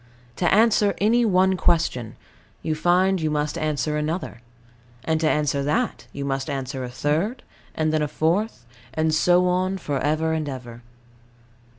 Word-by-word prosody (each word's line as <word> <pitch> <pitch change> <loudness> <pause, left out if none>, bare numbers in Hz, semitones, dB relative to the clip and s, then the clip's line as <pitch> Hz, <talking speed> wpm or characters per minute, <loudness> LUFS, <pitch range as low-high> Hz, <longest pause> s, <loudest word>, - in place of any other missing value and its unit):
To 175 - +1
answer 210 -1 +4
any 230 +4 +3
one 190 -2 +3
question, 160 -11 0 0.5
you 160 - 0
find 180 +3 +2
you 155 - 0
must 150 0 -1
answer 155 -1 -1
another; 150 -4 -3 0.6
and 160 0 0
to 155 - +3
answer 150 -2 +1
that 225 - -1
you 140 - -5
must 135 +1 -2
answer 135 -1 -4
a 125 - -5
third, 155 - -1 0.3
and 155 0 0
then 155 - +2
a 150 - +1
fourth; 165 - -1 0.3
and 155 0 +1
so 180 +3 +4
on 185 +2 0
for 145 -6 -3
ever 155 +3 0
and 155 -2 -2
ever. 120 -3 -8
155 Hz, 160 wpm, -23 LUFS, 145-185 Hz, 0.6 s, answer